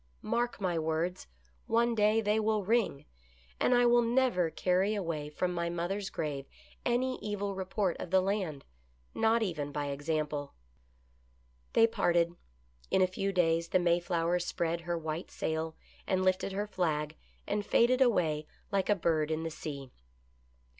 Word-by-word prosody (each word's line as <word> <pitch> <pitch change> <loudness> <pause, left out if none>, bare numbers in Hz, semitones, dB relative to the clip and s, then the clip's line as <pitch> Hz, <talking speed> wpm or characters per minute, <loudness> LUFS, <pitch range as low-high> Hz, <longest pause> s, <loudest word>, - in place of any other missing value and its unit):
Mark 240 -1 -1
my 180 -4 0
words, 160 - -2 0.4
one 235 +1 +3
day 215 0 +3
they 210 0 +2
will 215 -1 +1
ring; 215 -8 +1 0.5
and 250 - +4
I 245 0 +5
will 240 0 +5
never 235 -7 +2
carry 185 +5 +1
away 165 -7 -3
from 180 +4 -1
my 170 -1 -1
mother's 180 +4 -2
grave 140 -3 -4 0.4
any 255 +1 0
evil 205 -1 -3
report 190 0 -1
of - - -5
the 190 +1 +5
land, 185 -7 -2 0.5
not 225 +1 +3
even 155 -7 -3
by 145 0 -2
example." 145 0 -2 1.2
They 225 - +6
parted. 170 -6 +1 0.5
In 190 - +4
a - - +6
few 195 +2 -2
days 165 -2 +2
the 185 - +3
Mayflower 175 0 +1
spread 170 -1 -1
her 170 0 -2
white 160 +1 -4
sail 160 0 -3 0.3
and 185 -1 +1
lifted 185 +1 +1
her 200 +2 -2
flag, 155 -6 -1 0.3
and 205 0 -1
faded 245 +5 +3
away 160 -11 +2 0.2
like 195 -1 0
a 205 - +5
bird 160 -4 +1
in 160 0 -1
the 165 - -3
sea. 140 -4 -7
180 Hz, 155 wpm, -31 LUFS, 160-210 Hz, 1.2 s, They